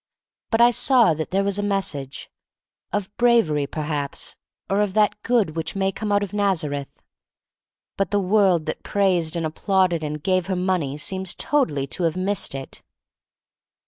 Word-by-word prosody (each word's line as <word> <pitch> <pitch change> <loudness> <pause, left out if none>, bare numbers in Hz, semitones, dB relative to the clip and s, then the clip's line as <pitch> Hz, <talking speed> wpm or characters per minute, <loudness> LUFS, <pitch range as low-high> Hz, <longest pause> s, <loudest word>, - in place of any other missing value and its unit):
But 225 0 +2
I 240 +1 +7
saw 245 -5 +4
that 155 0 -4
there 195 +2 +1
was 200 0 -1
a - - +1
message 190 -10 -3 0.3
— - - -64
of 205 -1 -3
brav 235 -8 +4
ery, 145 -1 0
perhaps, 150 -2 -4 0.3
or 195 +1 +1
of 205 -2 -1
that 210 -1 +2
good 225 -10 +1
which 160 +1 -3
may 195 0 +1
come 210 +2 -4
out 205 0 +3
of 200 -1 -6
Nazareth. 160 -9 -1 0.9
But 195 -2 0
the 205 - +1
world 190 -4 +3
that 155 - -4
praised 180 -5 +1
and 165 -1 -1
applauded 175 +1 +1
and 150 0 -4
gave 185 -1 +1
her 190 - -1
money 180 -6 -1
seems 190 +5 -2
totally 155 - +1
to 170 +6 -2
have 165 +2 0
missed 190 -5 0
it. 135 -1 -7
185 Hz, 175 wpm, -23 LUFS, 155-205 Hz, 0.9 s, I